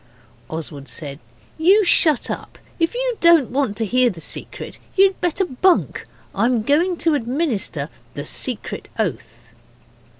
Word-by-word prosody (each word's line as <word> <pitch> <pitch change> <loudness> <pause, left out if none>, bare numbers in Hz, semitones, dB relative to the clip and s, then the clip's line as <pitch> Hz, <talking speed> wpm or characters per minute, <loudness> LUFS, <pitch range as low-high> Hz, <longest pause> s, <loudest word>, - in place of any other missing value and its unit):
Oswald 150 -3 -6
said, 145 -3 -6 0.4
'You 385 +6 +5
shut 310 -6 +3
up. - - -7 0.2
If 330 +6 0
you - - -1
don't 335 -8 +5
want 255 -6 -1
to 225 - 0
hear 250 +4 +3
the 180 -7 -8
secret - - -5 0.2
you'd 390 0 +4
better 355 +2 +1
bunk. 355 +5 +1 0.3
I'm 230 +2 +1
going 335 +8 +2
to 325 - +4
administer 245 - -1 0.3
the 145 - -5
secret 245 - -1
oath. 120 - -4
255 Hz, 135 wpm, -21 LUFS, -, 0.4 s, You